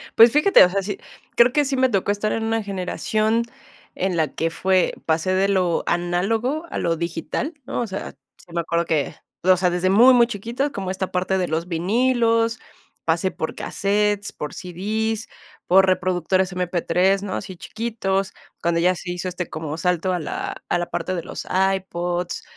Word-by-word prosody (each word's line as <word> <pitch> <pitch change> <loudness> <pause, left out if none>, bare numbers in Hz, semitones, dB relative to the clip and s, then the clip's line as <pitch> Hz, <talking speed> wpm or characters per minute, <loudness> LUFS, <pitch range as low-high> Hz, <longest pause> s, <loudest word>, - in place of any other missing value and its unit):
Pues 230 +1 +8
fíjate, 305 +7 +6
o 180 - +4
sea, 195 +1 0
sí, 200 +1 -5 0.4
creo 240 +1 +6
que 295 -1 +3
sí 275 - -1
me 260 0 +3
tocó 200 -2 +1
estar 205 +1 -1
en 225 - -1
una 225 -1 0
generación 215 +4 0 0.5
en 185 -1 -1
la 155 -2 +2
que 165 - -1
fue 185 +2 +1
pasé 165 +3 +1
de 190 +1 +2
lo 180 -4 +1
análogo 220 - 0
a - - -4
lo 165 -1 0
digital, 170 - -3
¿no? - - -2
O 235 - -2
sea, 190 0 -5 0.3
sí - - -20
me 170 - 0
acuerdo 170 0 -1
que, 155 -3 -1 0.3
o 185 0 +5
sea, 180 0 +2
desde 180 +1 0
muy 240 +7 +7
muy 240 -1 +5
chiquitos, 235 +6 -2
como 190 -2 -4
esta 190 0 -3
parte 185 +1 0
de 180 - 0
los 165 +2 -2
vinilos, 230 +5 +1 0.5
pasé 170 +3 +1
por 160 - -4
casetes, 205 +1 0
por 150 - -6
CDs, 215 +5 -3 0.4
por 190 +1 +6
reproductores 185 0 +1
MP3, 180 +2 +1
¿no? 190 - -4
Así 185 -2 -6
chiquitos, 200 -4 -2 0.3
cuando 170 0 +1
ya 180 +2 +3
se 175 - -6
hizo, 180 +1 -4
este, 180 -1 -4
como 155 -1 -5
salto 180 +1 0
a 175 - -1
la 155 - -4
a - - +2
la 175 - -1
parte 185 - -2
de 170 - -4
los - - -7 0.3
iPods, 175 -1 -3
190 Hz, 185 wpm, -22 LUFS, 175-220 Hz, 0.5 s, Pues